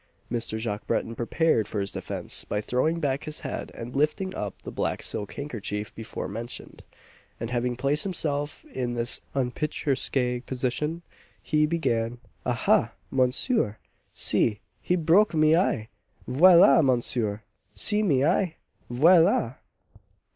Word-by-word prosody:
Mr. 115 -2 -2
Jacques 110 -2 -4
Breton 115 - -1
prepared 120 0 +1
for 105 - -3
his 100 0 -2
defence - - -3
by 105 - -2
throwing 130 +10 0
back 140 -2 -1
his 155 0 -5
head - - -5
and 120 +2 -7
lifting 155 +7 0
up 105 -2 -5
the - - -7
black - - -2
silk 105 - -3
handkerchief 105 -7 -5
before 110 0 -6
mentioned; 115 +4 -7 0.6
and 115 +1 -4
having 125 0 -1
placed 140 +4 +1
himself 150 - -2
in 120 -1 -2
this 120 +1 0
unpicturesque 130 -2 -1
position, 140 +6 -2 0.4
he 150 0 +2
began 120 -8 -1 0.3
"Ahah! - - +2 0.2
monsieur 130 - +1 0.3
see 105 -3 +2 0.2
he 180 - +1
broke 175 +4 +3
my 155 0 +5
eye! 115 - 0 0.4
Voilà, 165 +2 +7
monsieur! 120 -5 +1 0.3
see 210 - +2
my 140 -10 +2
eye! 175 -1 +1 0.4
_Voilà! 160 - +4
130 Hz, 130 wpm, -26 LUFS, 115-160 Hz, 0.6 s, Voilà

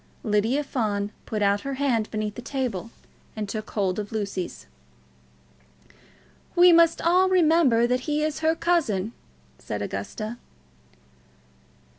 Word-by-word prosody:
Lydia 225 +6 +1
Fawn 210 -7 -2 0.2
put 215 -2 -1
out 200 0 +2
her 275 0 -4
hand 250 -6 0
beneath 215 -1 -3
the 245 - -8
table 245 -6 -3 0.5
and 215 -2 -4
took 215 +1 -5
hold 195 -2 -1
of 205 -1 -5
Lucy's. 200 - -4 1.9
"We 350 0 +7
must 335 0 +4
all 365 +3 +4
remember 320 -9 +4
that 250 +1 +1
he 300 0 +1
is 310 0 -2
her 320 +1 +2
cousin," 235 - 0 0.5
said - - -4
Augusta. 220 +2 -5
235 Hz, 125 wpm, -25 LUFS, 210-305 Hz, 1.9 s, We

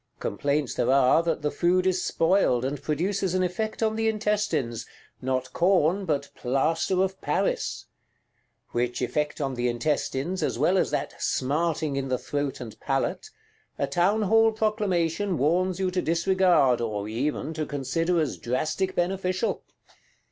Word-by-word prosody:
Complaints 140 +5 -1
there - - 0
are 135 +3 +5
that 165 -3 -2
the 150 - 0
food 180 +1 +2
is 185 -1 +2
spoiled, 165 -8 +2
and 140 +1 -3
produces 185 +4 -1
an 185 - +2
effect 215 +5 -2
on 220 0 +1
the 225 0 0
intestines: 210 - -1 0.3
not 130 0 -2
corn 180 +1 +2
but 140 -4 -1
plaster 160 +8 +1
of 190 0 -3
Paris! - - -1 0.9
Which 120 0 -1
effect 150 +5 -1
on 135 -2 -1
the 120 0 -1
intestines, 140 +7 -1
as - - -1
well 190 +1 +3
as - - +1
that - - -3
"smarting 150 +1 0
in 135 -1 -2
the 130 -1 0
throat 145 +1 -3
and 115 -3 -9
palate," 135 - -2 0.5
a - - +1
Townhall 215 +5 +3
Proclamation 205 -4 0
warns 180 +6 +1
you 185 -1 0
to 180 0 0
disregard, 170 -7 +3
or 105 -3 -3
even 145 +7 -2
to 155 -1 -3
consider 165 +5 0
as 155 -3 -1
drastic 155 +10 -1
beneficial. 185 +3 -1
165 Hz, 150 wpm, -26 LUFS, 135-190 Hz, 0.9 s, are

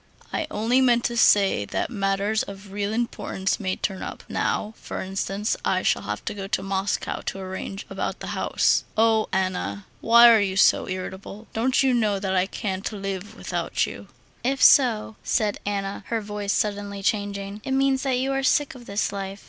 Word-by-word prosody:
"I 315 - -1
only 240 0 +2
meant 240 -2 +4
to 235 - -1
say 200 - +4
that 100 - -3
matters 200 0 0
of 195 0 -8
real 200 +1 -2
importance 220 -4 -2
may 185 -3 -1
turn 190 -2 -3
up. - - -7
Now, 215 +1 -1
for - - -6
instance, 195 +2 -2
I - - +1
shall - - +2
have - - -5
to - - -2
go 195 -1 -6
to 190 - -1
Moscow 195 +1 -2
to - - -2
arrange 190 +1 -6
about - - -4
the - - -5
house.... - - +2
Oh, 220 -1 +3
Anna, 100 - -2
why 235 +1 +7
are 225 - +6
you 190 -1 -1
so - - +4
irritable? 190 +3 -6
Don't 255 +4 +2
you 265 -1 +3
know 215 -4 +2
that 190 -1 -2
I 185 0 +2
can't 195 -1 -3
live 195 -1 -5
without - - -1
you?" - - -9 0.4
"If 270 +2 +1
so," 225 -5 +5
said 210 -2 0
Anna, 200 0 -3
her 230 - -1
voice 205 -1 -3
suddenly 205 -1 -2
changing, 200 0 -2
"it 265 - -2
means 270 0 +2
that 265 -2 0
you 265 +2 0
are 270 0 0
sick 290 +2 +2
of 245 -3 -13
this 200 0 -1
life.... 195 0 -5
205 Hz, 190 wpm, -24 LUFS, 195-230 Hz, 0.4 s, why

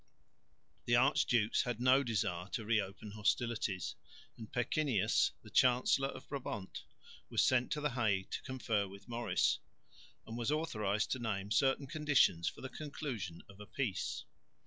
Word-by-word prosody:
The 120 - +3
archdukes 120 -3 +3
had 120 -2 -3
no 130 +2 +5
desire 95 -7 -1
to 115 -5 -2
re 110 0 +3
open 100 +2 -8
hostilities; 105 -5 -1 0.4
and 110 -2 -10
Pecquinius, 125 -3 +2
the - - -13
Chancellor 130 +2 +4
of - - -9
Brabant, 125 -8 -5 0.5
was - - +3
sent 125 -1 +2
to 150 - -3
the 150 -1 0
Hague 100 -6 0
to - - -3
confer 115 -6 -1
with 100 +2 -13
Maurice, 120 0 +1 0.7
and 115 - -7
was 120 -1 -1
authorised 105 -10 0
to 130 - 0
name 105 -4 -3
certain 135 +4 +3
conditions 140 - +3
for - - -13
the 130 - -4
conclusion 125 - -5
of 100 0 -15
a 105 - -10
peace. 130 -10 -2
115 Hz, 150 wpm, -35 LUFS, 100-130 Hz, 0.7 s, no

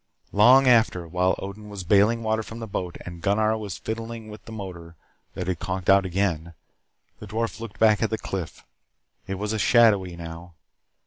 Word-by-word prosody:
Long 125 +6 +6
after, 110 -8 +3
while 90 +2 +1
Odin 105 +2 -8
was 100 -2 -6
bailing 105 +5 +3
water 110 0 0
from 115 +1 -9
the 115 - -5
boat, 90 -4 -4
and 85 -1 -8
Gunnar 110 +3 +2
was 105 -4 -5
fiddling 115 0 -6
with 105 - -11
the - - -10
motor 90 -6 -8 0.4
that 90 - -4
had 90 -2 -2
conked 95 0 0
out 100 -1 +4
again, 85 -3 -1 0.6
the 105 - -9
dwarf 115 +3 -3
looked 115 0 -8
back 110 -2 +4
at 115 - +1
the 110 - -1
cliff. 95 -6 -6 0.6
It 95 - -3
was 105 +3 -3
shadowy 100 -7 +4
now. 85 0 -9
100 Hz, 180 wpm, -25 LUFS, 90-110 Hz, 0.6 s, Long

